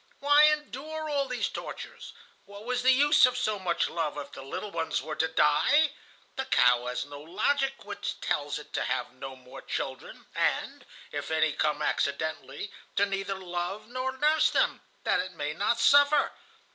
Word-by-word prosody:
Why 290 Hz, +1 st, +6 dB
endure 305 Hz, +1 st, -1 dB
all 280 Hz, -1 st, +1 dB
these -, -, -1 dB
tortures? -, -, -8 dB, 0.3 s
What 200 Hz, +1 st, -11 dB
was 250 Hz, 0 st, -1 dB
the 255 Hz, -, +4 dB
use 285 Hz, 0 st, +6 dB
of 250 Hz, 0 st, -2 dB
so 215 Hz, -5 st, 0 dB
much 175 Hz, -2 st, 0 dB
love, 160 Hz, -3 st, -2 dB
if 145 Hz, -, -6 dB
the -, -, -9 dB
little 140 Hz, +9 st, -6 dB
ones 165 Hz, -3 st, -1 dB
were 155 Hz, +3 st, -5 dB
to 160 Hz, -, +1 dB
die? 160 Hz, -, +3 dB, 0.5 s
The 265 Hz, -, -1 dB
cow 125 Hz, -, +4 dB
has 125 Hz, -, -2 dB
no 145 Hz, 0 st, -10 dB
logic 270 Hz, -, -1 dB
which 205 Hz, 0 st, -5 dB
tells 145 Hz, 0 st, -1 dB
it 150 Hz, -, -12 dB
to -, -, -1 dB
have -, -, -2 dB
no 130 Hz, +1 st, -8 dB
more 130 Hz, -1 st, -12 dB
children, -, -, -5 dB
and, -, -, -1 dB, 0.2 s
if -, -, -4 dB
any 160 Hz, -1 st, +2 dB
come 150 Hz, 0 st, 0 dB
accidentally, 155 Hz, +8 st, -2 dB, 0.2 s
to 200 Hz, -, +4 dB
neither 195 Hz, 0 st, -3 dB
love 185 Hz, +3 st, -4 dB
nor 255 Hz, +1 st, -3 dB
nurse 305 Hz, +3 st, +4 dB
them, -, -, +1 dB, 0.2 s
that -, -, +2 dB
it 185 Hz, 0 st, -3 dB
may 150 Hz, -2 st, -3 dB
not 215 Hz, +7 st, 0 dB
suffer. 285 Hz, +4 st, +5 dB
200 Hz, 175 wpm, -28 LUFS, -, 0.5 s, Why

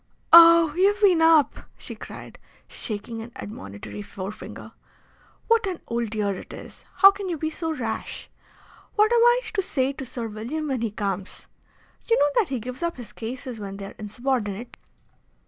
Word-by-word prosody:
"Oh, 335 Hz, -2 st, +9 dB
you've 400 Hz, +3 st, +3 dB
been 375 Hz, -6 st, +4 dB
up!" 325 Hz, -3 st, +4 dB, 0.2 s
she -, -, -9 dB
cried, -, -, -11 dB, 0.3 s
shaking 225 Hz, +1 st, -6 dB
an 230 Hz, +2 st, -9 dB
admonitory 105 Hz, -, -8 dB
forefinger. 190 Hz, -, -8 dB, 0.8 s
"What 460 Hz, -2 st, +3 dB
an 365 Hz, -3 st, -3 dB
old 235 Hz, -1 st, -2 dB
dear 210 Hz, -2 st, -1 dB
it 185 Hz, -, -9 dB
is! -, -, -11 dB
How 390 Hz, 0 st, +8 dB
can 395 Hz, -1 st, -6 dB
you 340 Hz, -, -2 dB
be 315 Hz, +1 st, -2 dB
so 325 Hz, 0 st, -3 dB
rash? 240 Hz, -8 st, -4 dB, 0.7 s
What 430 Hz, +2 st, +4 dB
am 470 Hz, -, +4 dB
I 480 Hz, +1 st, +5 dB
to 405 Hz, -, +1 dB
say 270 Hz, -6 st, -1 dB
to 270 Hz, -, -7 dB
Sir 235 Hz, -2 st, -5 dB
William 240 Hz, +9 st, -4 dB
when 260 Hz, -4 st, -1 dB
he 230 Hz, -, 0 dB
comes? 200 Hz, -2 st, -4 dB, 0.6 s
You 460 Hz, -, +3 dB
know 290 Hz, -, +4 dB
that 420 Hz, -, +1 dB
he 265 Hz, -2 st, -2 dB
gives 250 Hz, +5 st, -7 dB
up 340 Hz, -3 st, -2 dB
his 225 Hz, -4 st, -10 dB
cases 245 Hz, +1 st, -6 dB
when 195 Hz, -1 st, -6 dB
they 200 Hz, -, -7 dB
are -, -, -10 dB
insubordinate." 230 Hz, 0 st, -3 dB
255 Hz, 175 wpm, -24 LUFS, 215-335 Hz, 0.8 s, Oh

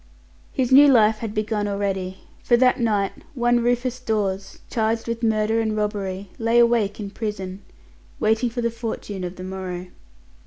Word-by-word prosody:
His 260 Hz, -2 st, -1 dB
new 285 Hz, +2 st, +9 dB
life 220 Hz, -5 st, +5 dB
had 225 Hz, -2 st, -4 dB
begun 215 Hz, -1 st, -1 dB
already: 195 Hz, -2 st, -2 dB, 0.2 s
for 240 Hz, -, +3 dB
that 250 Hz, +1 st, +4 dB
night 210 Hz, -4 st, +1 dB, 0.2 s
one, 240 Hz, -1 st, +3 dB
Rufus 245 Hz, +1 st, 0 dB
Dawes, 200 Hz, -5 st, -2 dB
charged 225 Hz, 0 st, -1 dB
with 230 Hz, 0 st, -3 dB
murder 220 Hz, 0 st, +2 dB
and 220 Hz, -1 st, -1 dB
robbery, 200 Hz, -2 st, -3 dB
lay 230 Hz, +1 st, +2 dB
awake 235 Hz, -4 st, +3 dB
in 200 Hz, -2 st, -5 dB
prison, 200 Hz, -3 st, -5 dB, 0.6 s
waiting 220 Hz, +3 st, +2 dB
for 240 Hz, +1 st, -4 dB
the 235 Hz, 0 st, 0 dB
fortune 225 Hz, -4 st, -5 dB
of 180 Hz, +1 st, -5 dB
the 185 Hz, -, -8 dB
morrow. 185 Hz, -1 st, -5 dB
215 Hz, 160 wpm, -23 LUFS, 195-235 Hz, 0.6 s, new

